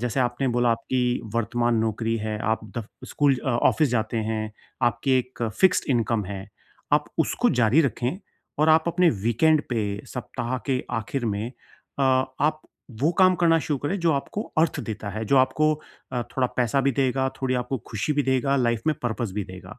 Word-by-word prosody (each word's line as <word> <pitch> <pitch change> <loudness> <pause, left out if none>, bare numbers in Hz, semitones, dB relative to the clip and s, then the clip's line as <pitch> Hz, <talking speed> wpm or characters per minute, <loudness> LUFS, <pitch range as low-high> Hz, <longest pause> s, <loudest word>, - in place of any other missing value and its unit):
जैसे 125 +2 -1
आपने 125 +2 0
बोला 120 0 +2
आपकी 125 +2 0
वर्तमान 120 +1 +1
नौकरी 115 +1 0
है, 110 -1 -3
आप 110 +1 0 0.2
दफ 115 -2 -4 0.2
स्कूल 140 -3 +2
अ, - - -1
ऑफ़िस 130 +5 +3
जाते 115 -1 -1
हैं, 110 -1 -2 0.3
आपकी 130 +2 +2
एक 125 -1 -5 0.2
फ़िक्स्ड 190 -1 +4
इंकम 115 -3 +1
है 100 +1 -7 0.4
आप - - +4
उसको - - +2
जारी 120 +8 +5
रखें 130 +2 -1 0.4
और 155 +1 +3
आप 160 0 +5
अपने 175 +1 +3 0.2
वीकेंड 155 +7 +3
पे 105 -3 -2
सप्ताह 125 0 -4
के 130 -2 0 0.2
आखिर 120 +3 -3
में 105 +2 -2 0.5
अ, - - +1
आप 130 +4 +1 0.4
वो 155 - +4
काम 185 -1 +6
करना 165 -1 +5
शुरू 145 -2 -2
करें 185 +9 -2
जो 165 -2 +3
आपको 145 +9 -2 0.2
अर्थ 160 -2 +2
देता 110 -3 -5
है, 110 +3 -4
जो 140 - +2
आपको 155 +4 +3 0.4
अ, 125 - -1
थोड़ा 125 +2 -1
पैसा 125 +2 +2
भी 135 0 +2
देगा, 130 +1 +1
थोड़ी 130 -1 +1
आपको 125 +1 -2
खुशी 110 +8 -1
भी 145 - +1
देगा, 135 +1 +1
लाइफ़ 120 -3 +1
में 155 - +3
पर्पस 115 -3 -2
भी 105 -1 -2
देगा 95 0 -11
125 Hz, 185 wpm, -25 LUFS, 115-140 Hz, 0.5 s, काम